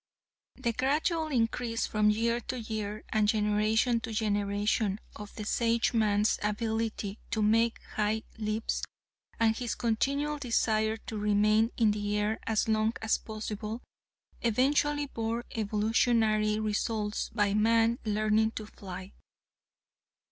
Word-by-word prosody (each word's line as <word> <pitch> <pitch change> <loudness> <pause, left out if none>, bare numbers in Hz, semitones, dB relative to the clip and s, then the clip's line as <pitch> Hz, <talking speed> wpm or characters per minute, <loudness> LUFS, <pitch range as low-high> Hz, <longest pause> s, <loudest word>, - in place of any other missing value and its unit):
"The 235 - -1
gradual 310 +6 +1
increase 230 -3 0
from 210 0 +2
year 230 +2 +1
to 250 +1 -5
year, 215 -1 -4
and 215 -1 +2
generation 215 +3 +2
to 225 0 -6
generation, 205 -1 0 0.2
of 210 -1 -9
the 215 - -5
Sageman's 225 -2 +2
ability 220 -1 -2
to 220 - 0
make 225 +2 +3 0.2
high 215 +1 +1 0.2
leaps, 215 +1 -1 0.6
and 225 -1 +3
his 240 0 -3
continual 280 +6 0
desire 220 -4 +1
to 220 -1 -6
remain 210 +2 +3
in 220 -3 +4
the 205 0 -1
air 210 +2 0
as 220 -1 +1
long 220 0 +2
as 220 - +2
possible, 215 +1 -5 0.6
eventually 290 +5 +2
bore 230 -2 -3
evolutionary 215 0 +2
results 210 0 -1
by 205 -2 +1
man 225 +2 +3
learning 215 0 +2
to 215 - -5
fly. 190 -2 -9
220 Hz, 120 wpm, -30 LUFS, 210-230 Hz, 0.6 s, in